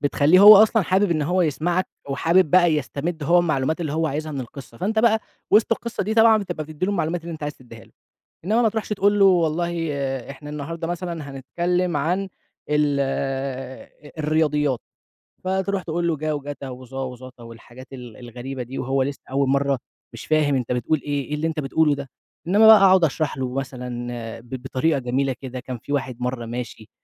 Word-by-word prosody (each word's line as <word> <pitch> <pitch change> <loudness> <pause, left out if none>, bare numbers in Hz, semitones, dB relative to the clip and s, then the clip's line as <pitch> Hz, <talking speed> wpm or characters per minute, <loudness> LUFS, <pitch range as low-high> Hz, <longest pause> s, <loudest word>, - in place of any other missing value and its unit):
بتخليه 145 +5 +4
هو 210 +1 +11
أصلًا 220 +1 +5
حابب 190 +1 +1
إن 155 -3 +1
هو 180 +5 +1
يسمعك 175 +4 0 0.2
وحابب 165 +4 +2
بقى 175 -1 +5
يستمد 150 +3 -3
هو 170 +4 +4
المعلومات 160 -2 0
اللي 155 -4 -3
هو 160 +1 0
عايزها 155 +1 -3
من 140 - -3
القصة. 125 -1 -10
فأنت 220 +4 -1
بقى 220 -1 +4 0.3
وسط 215 +2 +4
القصة 235 -1 -3
دي 215 +3 -2
طبعًا 225 -1 +6
بتبقى 175 -6 -4
بتدي 155 +4 -4
له 205 - 0
المعلومات 170 -2 -1
اللي 170 0 -7
أنت 155 - -9
عايز 150 0 -3
تديها 115 -3 -14
له. - - -25 0.5
إنما 220 +5 +2
ما 225 - +4
تروحش 220 0 -4
تقول 205 0 +2
له 200 - +6
والله 170 -2 +2 0.6
إحنا 145 +2 -9
النهارده 160 +3 -5
مثلًا 170 -4 -5
هنتكلم 175 +6 -1
عن 180 +7 -1 0.4
ال 150 -1 +2 1.2
الرياضيات، 150 -4 +1 0.6
فتروح 190 +1 -1
تقول 170 +1 -2
له 160 - 0
جا 155 +1 -2
وجتا 145 -1 -6
وظا 130 +1 -7
وظتا 125 -1 -9
والحاجات 120 +3 -13
ال 125 -4 -10
الغريبة 125 +2 -7
دي 125 +3 -7
وهو 135 +1 0
لسه 140 +1 -5
أول 135 0 +1
مرة، 140 -1 +1 0.3
مش - - -9
فاهم 155 -2 +2
أنت 125 -2 -2
بتقول 130 +5 0
إيه، 145 -2 -2
إيه 150 - -4
اللي 155 +2 -1
أنت 160 -1 -3
بتقوله 150 +1 +2
ده، 140 -2 -8 0.4
إنما 210 +4 +5
بقى 220 0 +10
أقعد 190 -2 +5
أشرح 155 -2 0
له 130 -1 -3
مثلًا 130 -2 -5 0.5
ب 115 +1 -19
بطريقة 135 +3 0
جميلة 130 +2 -1
كده 130 -1 -6
كان 125 0 -6
في 130 +5 -6
واحد 130 -4 -2
مرة 125 -1 -3
ماشي، 115 -2 -7
150 Hz, 190 wpm, -22 LUFS, 135-175 Hz, 1.2 s, هو